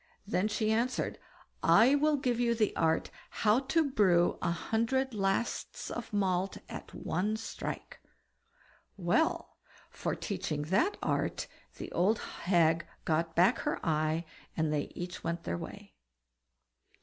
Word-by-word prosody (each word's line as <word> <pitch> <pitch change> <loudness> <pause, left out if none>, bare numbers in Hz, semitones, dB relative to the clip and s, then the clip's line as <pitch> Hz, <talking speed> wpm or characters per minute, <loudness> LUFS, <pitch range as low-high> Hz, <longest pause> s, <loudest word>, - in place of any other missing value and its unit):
Then 200 -1 +1
she 215 0 0
answered: 235 +3 0 0.4
"I'll 280 - +5
give 250 -3 0
you 235 -1 +2
the 215 -2 +1
art 160 0 +1 0.3
how 215 +3 +6
to 290 +3 +1
brew 180 -7 +3
a - - +1
hundred 230 +9 0
lasts 195 +2 -1
of 240 - -5
malt 190 -2 0
at - - -8
one 205 +6 -1
strike." 225 - -6 1.0
Well! 185 - +1 0.3
for - - -2
teaching 180 -7 -3
that 195 - +1
art - - 0 0.3
the - - -7
old 200 +6 +2
hag 170 -2 +1 0.2
got 165 +1 0
back 185 +8 +4
her 295 - -1
eye, 155 +1 +1 0.3
and 160 -1 +1
they 145 -1 -1
each 175 +1 -6
went 170 0 -2
their 85 - -2
way. - - -9
195 Hz, 130 wpm, -31 LUFS, 170-235 Hz, 1.0 s, how